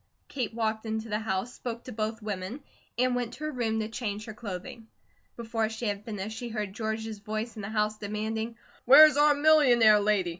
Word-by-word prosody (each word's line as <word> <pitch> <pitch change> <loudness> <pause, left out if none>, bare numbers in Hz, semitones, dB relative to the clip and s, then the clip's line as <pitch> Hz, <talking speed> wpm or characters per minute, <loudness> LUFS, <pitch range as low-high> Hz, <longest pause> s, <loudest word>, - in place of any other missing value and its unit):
Kate 250 -5 -3
walked 220 -1 -2
into 220 +1 -3
the 210 0 -1
house, 215 +2 -2
spoke 235 -1 -6
to 255 - -8
both 220 0 -3
women, 210 +6 -5 0.3
and 250 +1 +2
went 245 -1 -2
to 300 - -9
her 305 - -2
room 225 -4 -1
to 215 - -2
change 215 -2 -4
her 220 - -7
clothing. 215 +1 -8 0.5
Before 225 -1 -1
she 225 +2 -5
had 205 0 -3
finished, 215 -1 -5
she 240 - -5
heard 210 -3 -4
George's 220 0 -4
voice 215 +3 -4
in 215 - -6
the 195 - -5
house 215 0 -1
demanding: 220 +2 -3 0.3
"Where's 300 +4 +9
our 295 0 +5
millionaire 260 -8 +6
lady? 205 -3 +1
220 Hz, 195 wpm, -28 LUFS, 210-240 Hz, 0.5 s, Where's